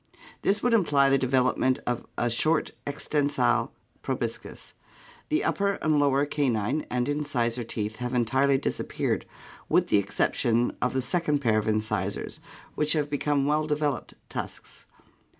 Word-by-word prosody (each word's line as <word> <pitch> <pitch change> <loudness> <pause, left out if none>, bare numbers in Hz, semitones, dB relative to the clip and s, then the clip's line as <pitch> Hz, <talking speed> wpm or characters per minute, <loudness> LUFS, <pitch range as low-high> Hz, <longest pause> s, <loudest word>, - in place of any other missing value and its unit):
This 205 +1 +1
would 245 - +3
imply 145 -10 +4
the 135 - +4
development 130 0 +2
of 120 -1 -2
a 120 0 +1
short 155 +7 +1 0.2
extensile 145 0 +1 0.3
proboscis. - - -4 0.6
The 310 - +1
up - - 0
per 200 0 +2
and 155 -1 +3
lower 140 0 +3
ca 145 -2 0
nine 120 +7 -1
and 125 0 0
incisor 125 -5 -1
teeth 110 -1 -4
have 125 +1 -3
entirely 130 +3 +3
disappeared, - - -2 0.4
with - - +3
the 105 - +5
exception 115 +4 +1
of 125 - +1
the 130 - +1
second 150 +2 +1
pair 110 -4 +3
of 105 - -4
incisors, 110 0 -1 0.3
which 150 0 +1
have 150 -2 -1
become 145 -1 +1
well 150 +1 +1
developed 150 -1 -1
tusks. - - -6
140 Hz, 150 wpm, -27 LUFS, 120-150 Hz, 0.6 s, the